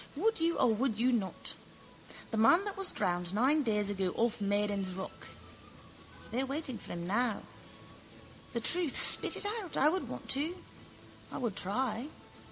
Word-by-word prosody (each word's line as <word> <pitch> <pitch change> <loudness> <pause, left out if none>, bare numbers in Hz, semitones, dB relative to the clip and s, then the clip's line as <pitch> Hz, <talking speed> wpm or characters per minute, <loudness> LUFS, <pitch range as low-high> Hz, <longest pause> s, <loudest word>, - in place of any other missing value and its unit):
Would 440 +8 0
you 335 +1 +1
or 245 -3 +3
would 225 0 -1
you 250 +2 +3
not? 210 -6 -3 0.8
The 225 - -2
man 335 - +5
that 405 - -4
was 390 -1 0
drowned 175 +1 -2
nine 275 +7 +3
days 210 -5 0
ago 190 -2 -1
off 230 -2 0
Maiden's 200 -2 -1
rock. 190 0 -8 1.0
They 245 - -1
are - - -1
waiting 275 -3 -3
for - - -9
him 170 0 -5
now. 220 +4 -1 1.1
The 235 - -2
truth, 340 +3 +1
spit - - +7
it - - -2 0.2
out. 370 - -6
I 295 - +4
would 370 +3 -2
want - - -8
to. 310 +7 -1 0.7
I - - -5
would 235 -6 -3
try. 230 +5 -2
235 Hz, 170 wpm, -31 LUFS, 205-295 Hz, 1.1 s, spit